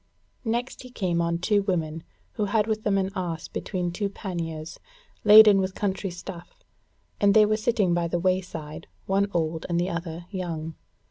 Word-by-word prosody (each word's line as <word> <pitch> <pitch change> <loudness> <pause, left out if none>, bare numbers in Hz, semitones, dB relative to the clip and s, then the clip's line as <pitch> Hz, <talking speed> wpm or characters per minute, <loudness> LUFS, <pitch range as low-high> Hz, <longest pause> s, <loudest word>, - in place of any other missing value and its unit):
Next 240 +3 -2
he 255 - -11
came 180 -8 -1
on 170 0 0
two 205 +4 +2
women 165 -5 -2 0.3
who 210 - -2
had 210 +1 +2
with 215 -1 -1
them 200 -2 +2
an 190 0 0
ass 170 -4 -3
between 180 -3 -3
two 200 +3 -2
panniers, 165 -5 -6 0.4
laden 210 -1 +9
with 190 -1 -2
country 195 -1 -2
stuff; 180 - -10 0.6
and 200 -1 +4
they 215 -1 +7
were 215 +1 +2
sitting 215 -4 +1
by 170 -1 +1
the 175 - -1
wayside, 175 -4 -2 0.2
one 195 +1 +1
old 160 -2 -2
and 170 0 +1
the 180 +2 -1
other 170 0 -5
young. 165 -4 -4
185 Hz, 175 wpm, -26 LUFS, 170-205 Hz, 0.6 s, laden